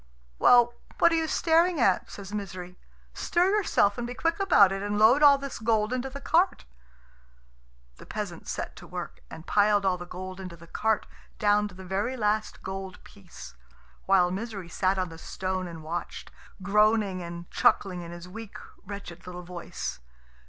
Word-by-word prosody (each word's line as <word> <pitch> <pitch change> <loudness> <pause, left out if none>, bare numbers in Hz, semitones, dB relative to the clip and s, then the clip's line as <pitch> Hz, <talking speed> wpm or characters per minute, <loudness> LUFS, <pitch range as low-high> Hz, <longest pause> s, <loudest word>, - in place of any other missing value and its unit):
"Well, 240 -1 +6 0.2
what - - +5
are - - +3
you 325 -1 +1
staring 335 +1 +3
at?" 195 -6 +2
says 200 0 -9
Misery. 185 -3 -6 0.4
"Stir 355 +2 +1
yourself, 240 - +2
and 240 - -3
be 245 - -6
quick 330 +3 0
about 315 - +6
it, 195 0 -3
and 205 0 -2
load 225 +7 +6
all 285 -1 +8
this 275 -1 -6
gold 220 0 +1
into 255 +1 -2
the 275 +1 -8
cart." 345 +6 +2 1.3
The - - -14
peasant - - -5
set - - -4
to - - -11
work, - - -7
and 160 - -10
piled 205 -1 +3
all 185 -1 +1
the 175 - -8
gold 185 +1 -7
into 180 -3 -8
the 170 - -14
cart 220 +5 0 0.3
down 210 0 +3
to 190 - -13
the 190 0 -10
very 205 +8 -2
last 215 -1 -1
gold 190 -1 -6
piece; 190 - -13 0.5
while 185 -2 +4
Misery 195 -2 -5
sat 190 +2 +1
on 185 -1 -1
the 165 0 -11
stone 185 0 -3
and 165 -2 -9
watched, 170 +2 -5 0.3
groaning 210 -1 +3
and 170 0 -7
chuckling 180 -3 +2
in 170 - -8
his 175 +1 -9
weak, 215 +3 -9 0.3
wretched 195 -3 -9
little 180 0 -7
voice. 175 - -6
200 Hz, 175 wpm, -27 LUFS, 180-230 Hz, 1.3 s, all